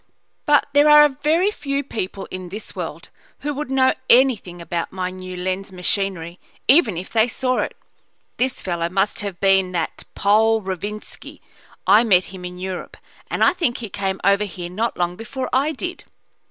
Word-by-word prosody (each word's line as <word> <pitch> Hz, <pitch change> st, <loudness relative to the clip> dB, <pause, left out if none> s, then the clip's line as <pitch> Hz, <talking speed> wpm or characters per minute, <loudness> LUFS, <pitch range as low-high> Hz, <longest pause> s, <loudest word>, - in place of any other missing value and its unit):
But 295 Hz, 0 st, +5 dB
there 290 Hz, +1 st, +6 dB
are 295 Hz, -2 st, +7 dB
very 335 Hz, +7 st, +3 dB
few 280 Hz, -7 st, -3 dB
people 200 Hz, -6 st, -5 dB
in 185 Hz, -1 st, -6 dB
this 210 Hz, +4 st, -7 dB
world -, -, -6 dB, 0.3 s
who 295 Hz, 0 st, -2 dB
would 290 Hz, 0 st, -4 dB
know 265 Hz, -1 st, +3 dB, 0.2 s
anything 235 Hz, -9 st, +4 dB
about 170 Hz, 0 st, -3 dB
my 185 Hz, -1 st, -3 dB
new 185 Hz, 0 st, -8 dB
lens 185 Hz, +2 st, -3 dB
machinery 180 Hz, -2 st, -2 dB, 0.3 s
even 250 Hz, -, +5 dB
if 180 Hz, -, -6 dB
they 225 Hz, 0 st, +3 dB
saw 255 Hz, +1 st, -1 dB
it. -, -, -3 dB, 0.6 s
This 255 Hz, +1 st, -1 dB
fellow 170 Hz, -2 st, -1 dB
must 195 Hz, +3 st, 0 dB
have 200 Hz, -4 st, -5 dB
been 190 Hz, -2 st, +3 dB
that 165 Hz, -2 st, -3 dB
Pole, 220 Hz, +2 st, +3 dB
Rovinski. 205 Hz, +3 st, -6 dB, 0.5 s
I 215 Hz, +3 st, +6 dB
met 185 Hz, -5 st, +4 dB
him 185 Hz, -1 st, -9 dB
in 180 Hz, 0 st, -7 dB
Europe, 185 Hz, 0 st, -6 dB, 0.3 s
and -, -, 0 dB
I -, -, +5 dB
think 330 Hz, -10 st, 0 dB
he 225 Hz, -3 st, -6 dB
came 195 Hz, 0 st, -2 dB
over 200 Hz, +1 st, +3 dB
here 175 Hz, -3 st, -7 dB
not 225 Hz, +5 st, -2 dB
long 175 Hz, 0 st, 0 dB
before 240 Hz, +5 st, -5 dB
I 275 Hz, +4 st, +2 dB
did." 355 Hz, +5 st, -6 dB
200 Hz, 175 wpm, -21 LUFS, 185-260 Hz, 0.6 s, are